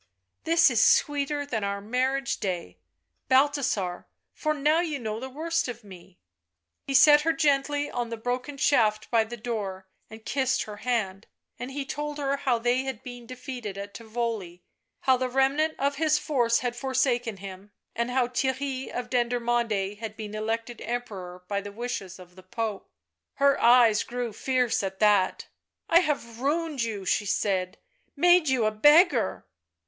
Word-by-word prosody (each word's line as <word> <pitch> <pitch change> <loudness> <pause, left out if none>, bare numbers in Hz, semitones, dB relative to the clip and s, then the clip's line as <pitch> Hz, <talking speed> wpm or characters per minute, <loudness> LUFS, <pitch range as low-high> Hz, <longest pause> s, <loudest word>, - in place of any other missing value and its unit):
" 95 - -53
This 330 -4 +5
is 230 -3 +2
sweeter 290 0 +2
than 225 -7 -3
our 200 0 -2
marriage 255 +5 -1
day, 175 - -4 0.5
Balthasar, 260 -9 +1 0.3
for 305 - -1
now 300 +3 +2
you 325 -4 -1
know 220 -3 -4
the 260 +2 -6
worst 330 +4 -1
of 240 -2 -7
me 185 -2 -14 0.4
" 85 0 -56
He 275 - -1
set 295 +2 +8
her 325 +2 +1
gently 290 -2 +1
on 240 -1 -3
the 230 - -5
broken 250 +5 -3
shaft 215 -7 +2
by 230 -2 +4
the 240 +2 -8
door 205 -5 -4 0.2
and 220 0 -12
kissed 265 -2 0
her 210 -1 -9
hand. 215 -5 -2 0.3
And 245 +2 -5
he 275 +1 -4
told 295 +1 -4
her 280 -1 -1
how 265 -4 +1
they 245 +2 +1
had 265 -4 -5
been 245 -2 -9
defeated 250 -5 -7
at 200 0 -7
Tivoli, 220 -6 -4 0.4
how 260 -1 +4
the 255 0 -2
remnant 275 +5 +1
of 280 +1 0
his 310 0 +3
force 240 -7 +1
had 240 -1 -1
forsaken 250 -4 0
him, 195 +1 -10 0.2
and 235 +1 -1
how 250 -1 +1
Theirry 265 +1 -2
of 245 0 -4
Dendermonde 235 -5 0
had 220 -1 -6
been 215 -1 -7
elected 225 +2 -3
Emperor 190 -7 -5
by 200 0 -1
the 205 0 -8
wishes 200 -4 -5
of 180 -1 -15
the 185 - -13
Pope. 210 +2 -4 0.5
Her 280 0 +3
eyes 235 -3 +6
grew 245 -2 -4
fierce 250 0 0
at 190 -1 -5
that. 205 -3 +3 0.4
"I 335 - +6
have 280 -9 -2
ruined 300 0 -1
you," 215 -4 -3
she 205 +3 0
said; 185 -2 -1 0.4
"made 350 0 +4
you 255 -4 +2
a 215 - +2
beggar." 295 - +4
240 Hz, 170 wpm, -26 LUFS, 210-275 Hz, 0.5 s, set